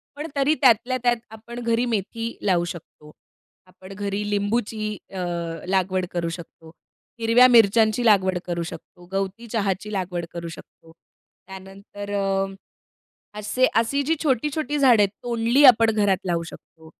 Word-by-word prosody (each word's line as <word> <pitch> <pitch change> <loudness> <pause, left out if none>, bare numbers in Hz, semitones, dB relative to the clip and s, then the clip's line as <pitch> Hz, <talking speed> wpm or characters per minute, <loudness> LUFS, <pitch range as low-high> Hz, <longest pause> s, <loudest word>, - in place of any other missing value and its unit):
पण 295 +2 -5
तरी 280 +2 +2
त्यातल्या 250 0 +4
त्यात 240 -1 +3
आपण 235 +2 -9
घरी 235 +1 0
मेथी 230 +1 -3
लावू 175 -3 +2
शकतो. 165 -3 -10 0.6
आपण 185 +1 -13
घरी 205 +1 -3
लिंबूची 210 +1 -2 0.2
अ, 190 - -5 0.5
लागवड 185 -1 0
करू 170 -1 -2
शकतो. 165 -1 -10 0.5
हिरव्या 230 +2 +6
मिरच्यांची 225 0 +4
लागवड 190 -4 +4
करू 170 -1 -3
शकतो. 175 +1 -11
गवती 195 +4 -3
चहाची 210 -2 -2
लागवड 180 -3 -3
करू 170 -1 -6
शकतो. 165 0 -13 0.6
त्यानंतर 195 +1 -10
अ, 195 -1 0 0.9
असे 250 +5 +1 0.2
अशी 280 +5 -1
जी 320 +4 +1
छोटी-छोटी 295 +2 -1
झाडं 250 -6 +5
आहेत, 200 - +3
तोंडली 240 +3 +2
आपण 230 -3 +7
घरात 205 -3 +2
लावू 170 -2 -1
शकतो. 160 0 -14
205 Hz, 140 wpm, -23 LUFS, 190-235 Hz, 0.9 s, आपण